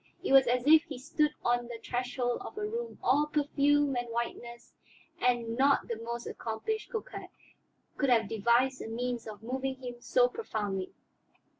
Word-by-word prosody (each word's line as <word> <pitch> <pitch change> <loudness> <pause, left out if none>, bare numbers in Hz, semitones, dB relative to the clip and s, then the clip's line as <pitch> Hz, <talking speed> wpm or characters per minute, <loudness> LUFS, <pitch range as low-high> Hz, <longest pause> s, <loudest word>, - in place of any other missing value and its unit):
It - - +1
was 270 -1 +7
as 245 0 +2
if 310 +1 +8
he 290 -6 -7
stood 300 +3 0
on 240 0 +2
the 235 -1 -6
threshold 245 0 -2
of - - -9
a - - -3
room 465 +2 -4
all 295 +3 +3
perfume 290 -1 +2
and 245 0 -2
whiteness; 235 0 -5 0.5
and 240 -2 +1
not 275 +3 +3
the 230 - -2
most 235 +1 -5
accomplished 235 - -4
coquette 475 +2 -6 0.7
could 275 - +1
have 225 -4 +4
devised 235 +5 +2
a - - -6
means 240 +1 -3
of 215 0 -9
moving 265 +2 -2
him 250 -2 -8
so - - +3
profoundly. 205 - -3
250 Hz, 165 wpm, -30 LUFS, 235-290 Hz, 0.7 s, if